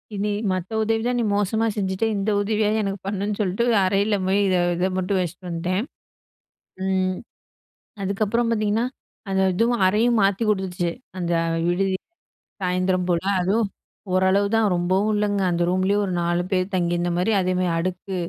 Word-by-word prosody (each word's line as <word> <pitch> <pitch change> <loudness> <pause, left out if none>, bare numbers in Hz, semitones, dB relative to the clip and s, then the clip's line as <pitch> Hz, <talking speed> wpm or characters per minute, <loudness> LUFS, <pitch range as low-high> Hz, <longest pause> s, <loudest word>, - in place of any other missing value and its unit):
"இனி 205 +1 -1 0.2
மத்த 185 +1 -3
உதவி 225 +1 0
தான் 245 0 0
நீ - - +1
மோசமா 205 +2 +1
செஞ்சுட்ட. 190 +1 -1
இந்த 200 +2 -1
உதவியாது 215 +1 +1
எனக்கு 195 0 -3
பண்ணுன்னு" 200 +1 -2
சொல்ட்டு 195 +3 0 0.2
அறையில 200 +2 +2
போய் 195 +2 +2
இத 185 - +2 0.2
இத 180 +2 0
மட்டும் 185 +1 0
வச்சுட்டு 180 +1 -6
வந்துட்டேன். 180 +4 -1 1.0
ம். 185 -1 0 0.9
அதுக்கப்புறம் 215 +4 0
பார்த்தீங்கன்னா, 215 +1 +1 0.4
அந்த 190 0 +2
இதுவும் 230 +2 +1
அறையும் 225 +5 +3
மாத்தி 195 +2 +2
கொடுத்துச்சு. 185 -4 -1 0.3
அந்த 175 -1 -2 0.4
விடுதி 190 +2 +1 0.7
சாயந்தரம் 185 0 0
போல, 170 -1 +1 0.2
அதுவும் 205 +4 +1 0.5
ஓரளவு 190 +2 +3
தான் 220 -2 +3
ரொம்பவும் 190 +5 +1
இல்லங்க. 205 -1 0
அந்த 175 0 0
ரூம்லயே 185 +2 +1
ஒரு 190 - -2
4 175 +1 +1
பேர் 185 +1 0
தங்கியிருந்த 175 -1 0
மாரி, 190 +5 +1
அதே 185 0 0
மாரி 180 -1 +1
அடுக்கு 185 +2 -3
190 Hz, 150 wpm, -23 LUFS, 185-210 Hz, 1.0 s, அறையும்